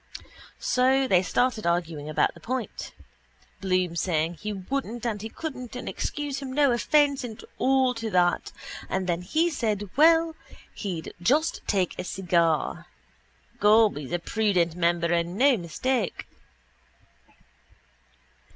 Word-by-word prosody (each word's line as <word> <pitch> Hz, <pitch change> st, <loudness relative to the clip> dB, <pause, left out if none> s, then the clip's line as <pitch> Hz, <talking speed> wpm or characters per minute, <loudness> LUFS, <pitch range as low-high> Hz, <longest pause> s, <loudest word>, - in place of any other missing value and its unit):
So 265 Hz, +1 st, +2 dB
they 180 Hz, -6 st, +4 dB
started 220 Hz, +3 st, 0 dB
arguing 165 Hz, -4 st, -1 dB
about 155 Hz, -, +1 dB
the -, -, -15 dB
point, 250 Hz, -1 st, -4 dB, 0.7 s
Bloom 185 Hz, -3 st, 0 dB
saying 165 Hz, -1 st, 0 dB
he 210 Hz, +4 st, -5 dB
wouldn't 235 Hz, +4 st, -4 dB
and 215 Hz, -4 st, -2 dB
he 220 Hz, -, -5 dB
couldn't 255 Hz, -4 st, -7 dB
and 250 Hz, -, -6 dB
excuse 290 Hz, -2 st, -3 dB
him 270 Hz, -1 st, -6 dB
no 285 Hz, -1 st, +4 dB
offence 280 Hz, +3 st, +2 dB
and 235 Hz, -2 st, -8 dB
all 260 Hz, -1 st, +3 dB
to 230 Hz, -1 st, -4 dB
that 180 Hz, -3 st, +1 dB, 0.4 s
and 190 Hz, 0 st, -1 dB
then 175 Hz, -1 st, -1 dB
he 320 Hz, -, +1 dB
said 210 Hz, -, -2 dB
well 325 Hz, +2 st, +5 dB, 0.4 s
he'd 175 Hz, -6 st, -5 dB
just 300 Hz, -, +2 dB
take 190 Hz, -4 st, +1 dB
a -, -, -2 dB
cigar. 170 Hz, -4 st, 0 dB, 0.7 s
Gob, 215 Hz, +1 st, +5 dB
he's 145 Hz, -1 st, -7 dB
a 175 Hz, -, +1 dB
prudent 180 Hz, -2 st, +1 dB
member 170 Hz, 0 st, +1 dB
and 170 Hz, +2 st, -1 dB
no 270 Hz, +2 st, +5 dB
mistake. 215 Hz, +5 st, -2 dB
210 Hz, 135 wpm, -26 LUFS, 175-260 Hz, 0.7 s, well